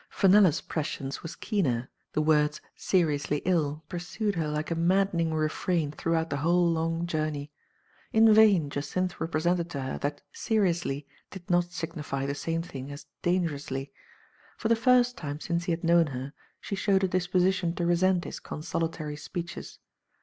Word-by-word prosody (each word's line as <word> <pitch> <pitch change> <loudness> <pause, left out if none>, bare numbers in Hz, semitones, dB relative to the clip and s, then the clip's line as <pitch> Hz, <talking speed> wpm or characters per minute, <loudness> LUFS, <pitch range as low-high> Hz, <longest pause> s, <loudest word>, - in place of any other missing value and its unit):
Fenella's 190 -4 +5
prescience 140 -3 -4
was 165 - -7
keener; 130 - -1 0.2
the 155 - +1
words 150 -1 +3 0.2
seriously 150 -5 +1
ill 155 -4 +1
pursued 195 +4 -3
her 165 -4 -1
like 150 +2 -3
a - - +1
maddening 170 -1 +2
refrain 155 0 0
throughout 165 +1 -1
the 140 - 0
whole 170 +4 +3
long 165 +1 -1
journey. 155 -3 -2 0.6
In 220 0 +6
vain 200 -9 +5
Jacynth 180 +6 -2
repre 160 -1 -2
sented 175 -1 +1
to 140 -5 -4
her 130 - -3
that 145 0 -3
''seriously'* 175 - 0 0.2
did 185 -3 -10
not 175 0 +4
signify 165 -5 -4
the 140 - -1
same 165 +3 -2
thing 140 -4 -7
as 145 - -9 0.2
"dangerously.*' 145 -6 -1 0.7
For 220 - -2
the 230 - +5
first 245 +1 +3
time 145 -2 -5
since 170 +1 -2
he 180 - 0
had 165 0 -2
known 170 -1 +4
her, 135 +1 -6 0.3
she - - -7
showed 195 0 +2
a - - +4
disposition 180 -1 +1
to 175 - -1
resent 175 +1 +3
his - - -6
consolatory 155 -1 -4
speeches. 175 +3 -6
165 Hz, 160 wpm, -28 LUFS, 150-180 Hz, 0.7 s, In